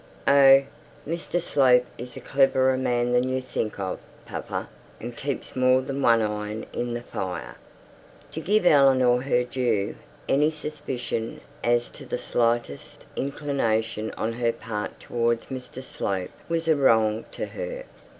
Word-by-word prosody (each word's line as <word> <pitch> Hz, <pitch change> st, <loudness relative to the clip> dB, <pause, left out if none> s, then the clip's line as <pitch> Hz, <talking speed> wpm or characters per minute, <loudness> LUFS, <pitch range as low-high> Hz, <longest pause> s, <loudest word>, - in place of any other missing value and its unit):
'Oh, 135 Hz, -1 st, +7 dB, 0.4 s
Mr 170 Hz, +2 st, -2 dB
Slope 130 Hz, -7 st, +4 dB
is 125 Hz, +1 st, -8 dB
a -, -, -7 dB
cleverer 130 Hz, -1 st, +3 dB
man 125 Hz, -2 st, 0 dB
than 125 Hz, +1 st, +2 dB
you 130 Hz, 0 st, 0 dB
think 125 Hz, -4 st, -3 dB
of, 95 Hz, -2 st, -3 dB, 0.3 s
papa, -, -, -5 dB, 0.3 s
and 120 Hz, +1 st, -7 dB
keeps 140 Hz, +2 st, -4 dB
more 130 Hz, 0 st, +4 dB
than 135 Hz, +1 st, -4 dB
one 115 Hz, -3 st, +4 dB
iron 105 Hz, +1 st, -3 dB
in 120 Hz, 0 st, -2 dB
the 120 Hz, -, -5 dB
fire.' 95 Hz, -5 st, -5 dB, 0.8 s
To -, -, -5 dB
give 205 Hz, +3 st, +2 dB
Eleanor 130 Hz, -5 st, +5 dB
her 125 Hz, -2 st, +2 dB
due, 120 Hz, -5 st, -1 dB, 0.3 s
any 150 Hz, +3 st, +3 dB
suspicion 135 Hz, -7 st, -4 dB, 0.2 s
as 120 Hz, 0 st, +1 dB
to -, -, -12 dB
the -, -, -2 dB
slightest 115 Hz, -11 st, -1 dB
inclination 115 Hz, -6 st, -1 dB
on 115 Hz, +1 st, -1 dB
her 120 Hz, 0 st, +1 dB
part 115 Hz, -2 st, -5 dB
towards 115 Hz, -1 st, 0 dB
Mr 130 Hz, 0 st, -7 dB
Slope 95 Hz, -7 st, -3 dB, 0.2 s
was 165 Hz, 0 st, -1 dB
a 160 Hz, -, +5 dB
wrong 110 Hz, -5 st, +3 dB
to -, -, -3 dB
her. -, -, -6 dB
125 Hz, 145 wpm, -25 LUFS, 115-135 Hz, 0.8 s, Oh